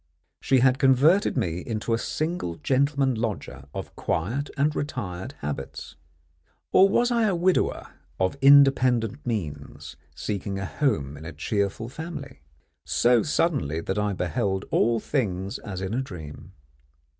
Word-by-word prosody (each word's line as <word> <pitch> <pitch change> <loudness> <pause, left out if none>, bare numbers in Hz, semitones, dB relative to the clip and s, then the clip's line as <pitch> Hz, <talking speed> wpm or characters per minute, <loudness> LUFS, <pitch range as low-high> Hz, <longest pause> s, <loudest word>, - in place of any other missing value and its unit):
She 130 -2 +2
had 130 +1 +4
converted 140 +8 +4
me 90 -8 -1
into 110 +3 -3
a 115 - +1
single 155 - -2
gentleman 135 - +1
lodger 110 - -4
of - - -7
quiet 120 - -2
and 145 +2 +1
retired 100 -11 -4
habits 70 -1 -6 0.8
or 195 +1 +6
was 240 +4 +2
I 230 -2 +3
a 195 - +1
widower 180 +2 0 0.3
of 95 +4 +1
independent 135 -3 +5
means 75 - -5 0.2
seeking 100 -1 -3
a 100 - -3
home 80 - -1
in 75 - -10
a 85 - -6
cheerful 100 +7 -2
family? 145 - -8 0.4
so 120 -1 +3
suddenly 140 - 0
that 95 +5 -2
I 105 -1 0
beheld 95 +1 -1
all 115 0 +3
things 100 -8 -2
as 95 -2 -6
in 95 +2 -3
a 125 - 0
dream. 80 - -9
115 Hz, 140 wpm, -25 LUFS, 95-140 Hz, 0.8 s, or